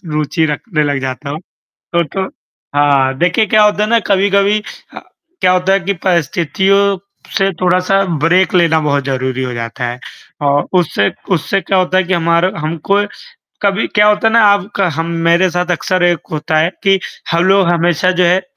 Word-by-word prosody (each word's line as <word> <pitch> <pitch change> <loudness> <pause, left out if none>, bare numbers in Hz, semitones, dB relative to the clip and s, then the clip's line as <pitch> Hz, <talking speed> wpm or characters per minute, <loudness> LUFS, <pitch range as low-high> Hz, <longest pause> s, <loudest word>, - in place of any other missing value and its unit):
रुचि 155 0 -1
रखने 155 +2 -2
लग 145 -2 -1
जाता 130 +2 -5
हूँ। 150 +2 -5 0.5
तो 170 0 +2
तो 190 +5 -4 0.5
हाँ, 140 -2 +2
देखिए 180 +5 +2
क्या 215 +1 +3
होता 210 0 +2
है - - -3
ना 235 - +4
कभी-कभी 200 +1 +2 0.8
क्या 180 - +3
होता 185 +1 +1
है 195 - +2
कि 195 +3 -2
परिस्थितियों 190 +4 +1 0.4
से 195 0 +1
थोड़ा-सा 185 +2 +2 0.2
ब्रेक 185 +3 +2
लेना 165 -3 +3
बहुत 145 -2 -1
ज़रूरी 130 -1 -2
हो 125 - -4
जाता 115 +1 -5
है। 120 +1 -4 0.4
और 145 0 +1
उससे 100 -12 0 0.2
उससे 170 +4 -1
क्या 190 +1 0
होता 185 0 +1
है 190 - +2
कि 180 - -3
हमारा 170 +1 +1
हमको 165 +6 -1 0.6
कभी 200 +1 +1
क्या 210 0 +3
होता 210 +1 +2
है - - -3
ना 230 - +6
आपका 200 -1 +1
हम 165 - -1 0.2
मेरे 175 +3 +3
साथ 180 +1 -2
अक्सर 180 +1 -1
एक 175 -1 +2
होता 155 0 -1
है 160 +2 +2
कि 195 0 +3 0.3
हम 170 +1 +2
लोग 190 0 +3
हमेशा 175 +1 +1
जो 180 0 +1
है 175 +2 +3
उ - - -23
175 Hz, 185 wpm, -14 LUFS, 155-195 Hz, 0.8 s, ना